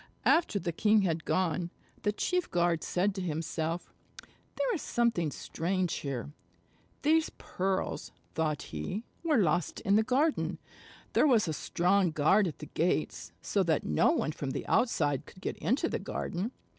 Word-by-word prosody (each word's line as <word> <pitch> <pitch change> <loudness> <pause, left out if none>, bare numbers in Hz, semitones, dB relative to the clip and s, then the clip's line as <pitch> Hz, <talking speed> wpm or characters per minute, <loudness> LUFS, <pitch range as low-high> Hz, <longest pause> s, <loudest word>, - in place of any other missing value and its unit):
After 325 -10 +4
the 175 -3 -2
king 210 +4 +3
had 165 -3 -1
gone, 180 -1 0 0.3
the 210 - +1
chief 360 - -1
guard 170 -2 +1
said 190 +3 +1
to 190 - -4
himself: 165 0 -3 0.6
"There - - 0
is 345 - -2
something 230 -9 +1
strange 175 +5 -2
here. 140 -1 -4 0.7
These 315 +2 +3
pearls," 190 +1 -2 0.2
thought 155 -2 -1
he, 80 - -4 0.2
"were 315 -4 +3
lost 175 -5 +1
in 200 +2 +3
the - - +5
garden. 275 +7 +1 0.6
There - - +5
was 230 -8 +4
a 160 - -1
strong 180 +4 +2
guard 165 +6 +3
at 160 - -5
the 150 - -8
gates, 170 +3 0
so 200 - +1
that 165 -5 +1
no 75 - +3
one - - +1
from 145 -2 -4
the - - -4
outside 145 - +1
could - - -14
get - - -3
into 275 +8 +1
the - - -2
garden. 195 +8 -3
180 Hz, 160 wpm, -30 LUFS, 160-215 Hz, 0.7 s, the